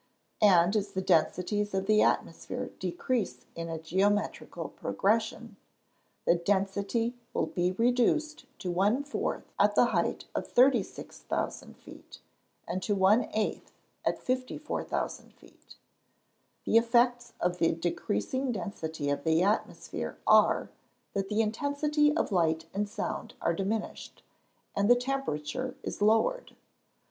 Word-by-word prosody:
And 190 -1 +5
as 200 -1 -1
the 190 - -1
densities 185 +6 +1
of 190 0 0
the 215 +1 +4
atmosphere - - -1
decrease 230 - -2
in 165 0 -5
a 165 - -3
geometrical 195 +6 -1
progression, 220 +2 -1 0.7
the - - +5
density 200 +6 0 0.2
will - - +2
be 180 0 -1
reduced 250 - +1 0.2
to 180 - -2
one 205 +10 +2
fourth 285 - -3
at - - +4
the - - +6
height - - 0
of - - -3
36,000 260 +3 0
feet; - - -13 0.5
and 185 - -2
to 205 - 0
one 200 +5 +4
eighth 215 -1 -2 0.3
at - - 0
54,000 255 0 -3
feet. - - -19 0.9
The 225 - +4
effects 240 +1 +2
of 180 0 0
the 165 - +3
decreasing 175 - -2
density 160 -7 -3
of 140 0 -2
the 160 +2 +3
atmosphere 205 +3 -2
are, - - +4 0.4
that 195 -1 -2
the 215 +1 +2
intensity 285 +6 +1
of - - 0
light 160 -3 +1
and 205 +1 -1
sound 210 0 -4
are 170 - +1
diminished, 200 +5 -4 0.5
and 200 +1 +2
the 245 - +8
temperature 255 - -3
is - - -5
lowered. 225 - +2
205 Hz, 125 wpm, -29 LUFS, 180-245 Hz, 0.9 s, the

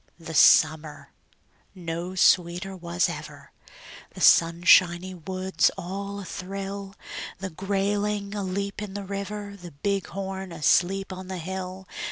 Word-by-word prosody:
The 165 -1 -8
summer 155 0 +4 0.6
no 175 +1 -5
sweeter 180 +1 +3
was 175 0 0
ever; - - -8 0.6
The - - -8
sunshiny 175 +2 +5
woods 185 +2 0
all 200 +3 -5
athrill; 195 +1 -6 0.4
The 190 0 -5
grayling 200 +2 -1
aleap 200 0 -3
in 200 -2 -6
the 205 - -4
river, 200 +1 -5
The 175 -3 -10
bighorn 190 +2 -3
asleep 185 +5 +2
on 185 0 -8
the 190 0 -5
hill. 185 +2 -6
190 Hz, 115 wpm, -26 LUFS, 175-195 Hz, 0.6 s, sunshiny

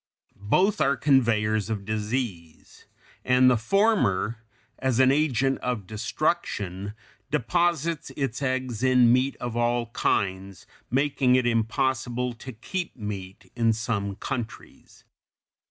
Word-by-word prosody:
Both 185 - +1
are 140 0 +2
conveyers 115 -6 +2
of 105 -3 -3
disease, 105 -6 -4 0.4
and 130 0 +5
the - - +4
former, 120 - +1 0.4
as 130 -2 0
an 130 0 +6
agent 135 -2 +1
of 120 -6 -3
destruction, 105 - -2 0.3
deposits 170 +3 0
its 135 -2 -2
eggs 130 -4 -2
in 125 -2 +5
meat 130 +2 +1
of 120 -2 -5
all 120 0 0
kinds, 95 -3 -1 0.2
making 135 -1 +2
it 130 -1 +2
impossible 120 +1 0
to 130 +3 -9
keep 170 - -5
meat 100 -4 -7
in 115 -2 +2
some 105 -3 -2
countries. 115 +2 -7
120 Hz, 115 wpm, -26 LUFS, 110-130 Hz, 0.4 s, an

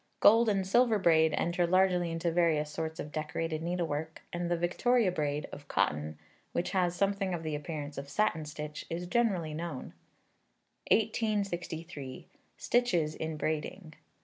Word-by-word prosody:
Gold 225 +2 +6
and 195 -2 +1
silver 230 +3 +4
braid 160 -4 +4
enter 175 +1 +1
largely 180 -1 +3
into 165 +1 -1
various 160 -3 +2
sorts 160 +1 -4
of 150 - -5
decorated 155 +1 -2
needlework, 160 -2 -3
and 175 0 -2
the 175 - +1
Victoria 210 +5 +2
braid, 150 -3 -1
of 145 - -10
cotton, 75 -5 0 0.4
which 175 - -1
has 180 -2 +1
something 195 -1 0
of 165 - -6
the 155 -1 -3
appearance 150 -1 -4
of 140 0 -8
satin 165 -2 +1
stitch, 150 0 -6
is 170 +2 -3
generally 180 -6 +1
known. 160 -4 -5 1.0
1863. 180 - -1 0.3
Stitches 180 -11 +1
in 160 0 -4
Braiding. 155 +3 -3
170 Hz, 145 wpm, -31 LUFS, 155-190 Hz, 1.0 s, Gold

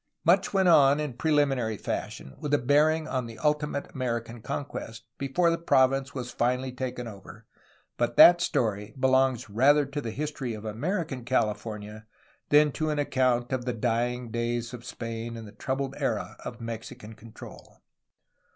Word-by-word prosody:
Much - - +4
went 190 -2 +2
on 145 -4 +6
in 150 -4 -3
preliminary 135 -5 +1
fashion, 65 - -5
with 150 -1 -4
a - - +3
bearing 150 +4 +2
on 130 -5 -2
the 115 -1 -10
ultimate 150 -1 -1
American 120 -2 -3
conquest, 115 -3 -6
before 165 +6 +2
the 165 - -1
province 135 -3 +2
was 125 -2 -5
finally 125 +2 0
taken 125 -1 -5
over, 105 +1 -11 0.5
but - - -1
that 175 0 +9
story 105 -8 -1
belongs 130 -1 +2
rather 140 +8 +4
to 145 +2 -5
the 115 - -4
history 135 -2 -4
of 110 0 -9
American 145 - -3
California 110 -3 -2 0.4
than 150 0 +5
to 155 +2 -2
an 150 - -1
account 130 -3 +1
of 125 -2 -2
the 125 - -1
dying 120 +1 -1
days 120 +1 -2
of 120 -1 -8
Spain 115 -1 -6
and 110 -1 -8
the - - -11
troubled 135 +5 -3
era - - -2
of 120 - -7
Mexican 115 -1 -7
control. 110 0 -13
125 Hz, 160 wpm, -27 LUFS, 115-145 Hz, 0.5 s, that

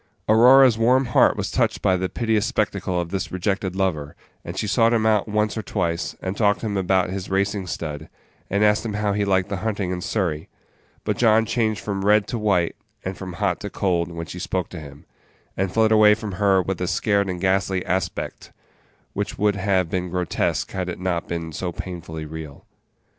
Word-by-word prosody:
Aurora's 125 +2 +6
warm 130 +4 +4
heart 120 - +4
was - - -3
touched - - 0
by 95 - +4
the 95 0 -2
piteous 110 -2 0
spectacle 100 -6 -1
of 85 -1 -4
this 95 - -3
rejected 95 0 -2
lover, 80 -7 -1 0.3
and - - -7
she - - -1
sought 115 +3 +3
him 110 -1 +1
out 110 -2 +2
once 105 0 0
or 110 - -2
twice, 85 -5 -2
and 95 +1 -2
talked 100 -3 +2
to - - -4
him 105 -2 -2
about 95 -1 +1
his 95 -1 -5
racing 100 0 0
stud, 75 -2 -5 0.4
and 100 +2 +1
asked 105 0 +3
him 110 -3 -3
how 105 -1 0
he 105 0 0
liked 95 -1 +1
the 100 - -2
hunting 100 -2 -2
in 90 -1 -3
Surrey; 85 -7 -2 0.5
but - - -1
John 110 -1 +4
changed 110 -1 0
from 100 -2 -3
red 105 0 +4
to 120 - -2
white, 100 -6 +1 0.3
and 95 +1 -3
from 90 -1 -7
hot 90 -1 -1
to 105 - -5
cold, 90 -4 0
when 85 0 -5
she 90 - -8
spoke 90 0 -2
to 90 - -8
him, 70 -2 -12 0.5
and 95 -1 -1
fled 110 +1 +3
away 105 -1 +6
from 110 -1 -6
her 95 0 +2
with 95 +1 -3
a 90 - 0
scared 100 +1 +1
and 90 -1 -3
ghastly 95 0 0
aspect, 95 0 -3 0.6
which 100 0 -3
would 105 0 +2
have 95 -2 +1
been 90 -1 -2
grotesque 90 0 -1
had 95 -1 -3
it 90 - -5
not 90 -2 -2
been 85 -1 -4
so 90 +3 -3
painfully 85 -3 -7
real. 75 -2 -9
95 Hz, 205 wpm, -23 LUFS, 90-105 Hz, 0.6 s, Aurora's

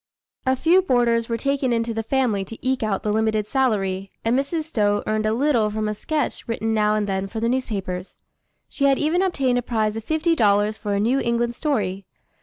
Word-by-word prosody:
A 260 - +4
few 335 +7 +4
boarders 240 -8 +1
were 230 - 0
taken 275 0 0
into 230 0 0
the 225 - -2
family 225 -4 0
to 225 - -9
eke 260 0 +1
out 215 -3 -1
the 210 - 0
limited 215 -1 +1
salary, 195 -8 0 0.2
and 230 +2 +2
Mrs. 280 +4 -1
Stowe 210 -9 0
earned 215 0 0
a - - +2
little 240 -3 +2
from 215 0 -2
a 210 - -1
sketch 300 +7 -3
written 225 -1 -1
now 210 -1 +2
and 210 -1 0
then 195 -1 -2
for 220 +3 -5
the 230 - 0
newspapers. 200 -7 -3 0.5
She 280 - -1
had 275 -1 +4
even 320 +4 +1
obtained 270 -10 +1
a - - -2
prize 220 -3 -1
of 225 - -5
fifty 315 +5 +1
dollars 210 -3 +3
for 205 -2 -3
a - - 0
New 240 +6 +2
England 235 -1 0
story. 200 -10 -2
230 Hz, 210 wpm, -23 LUFS, 210-265 Hz, 0.5 s, A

